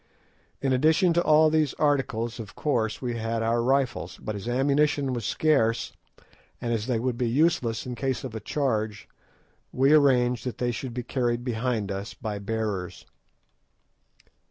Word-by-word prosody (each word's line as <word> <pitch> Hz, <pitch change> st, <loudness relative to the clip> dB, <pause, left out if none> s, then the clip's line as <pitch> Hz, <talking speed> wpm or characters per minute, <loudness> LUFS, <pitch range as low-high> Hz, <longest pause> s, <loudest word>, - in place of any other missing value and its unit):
In 135 Hz, -1 st, +2 dB
addition 160 Hz, +7 st, +3 dB
to 170 Hz, -, +3 dB
all 155 Hz, 0 st, +5 dB
these 155 Hz, -3 st, +1 dB
articles, 125 Hz, -6 st, 0 dB
of 110 Hz, -2 st, -8 dB
course 120 Hz, -6 st, -1 dB
we 120 Hz, -2 st, -2 dB
had 115 Hz, 0 st, -2 dB
our 115 Hz, +1 st, +1 dB
rifles, 135 Hz, +1 st, 0 dB
but 110 Hz, -, -5 dB
as 100 Hz, +3 st, -7 dB
ammunition 140 Hz, +2 st, +1 dB
was 120 Hz, -4 st, -3 dB
scarce, 125 Hz, -8 st, +1 dB, 0.7 s
and 120 Hz, -1 st, -2 dB
as 110 Hz, 0 st, -2 dB
they 125 Hz, -3 st, +1 dB
would 120 Hz, +1 st, -2 dB
be 120 Hz, -2 st, +1 dB
useless 130 Hz, -4 st, +1 dB
in 125 Hz, -, -4 dB
case 130 Hz, +1 st, -2 dB
of 130 Hz, -4 st, -6 dB
a 110 Hz, -, -4 dB
charge, 110 Hz, -4 st, -2 dB, 0.6 s
we 135 Hz, +3 st, +3 dB
arranged 125 Hz, -5 st, +4 dB
that 125 Hz, -, -4 dB
they 125 Hz, -1 st, 0 dB
should 120 Hz, +1 st, -6 dB
be 125 Hz, -, -3 dB
carried 120 Hz, -1 st, -1 dB
behind 115 Hz, -4 st, -1 dB
us 100 Hz, +2 st, -5 dB
by 105 Hz, -2 st, -5 dB
bearers. 100 Hz, -3 st, -3 dB
120 Hz, 160 wpm, -26 LUFS, 115-135 Hz, 0.7 s, all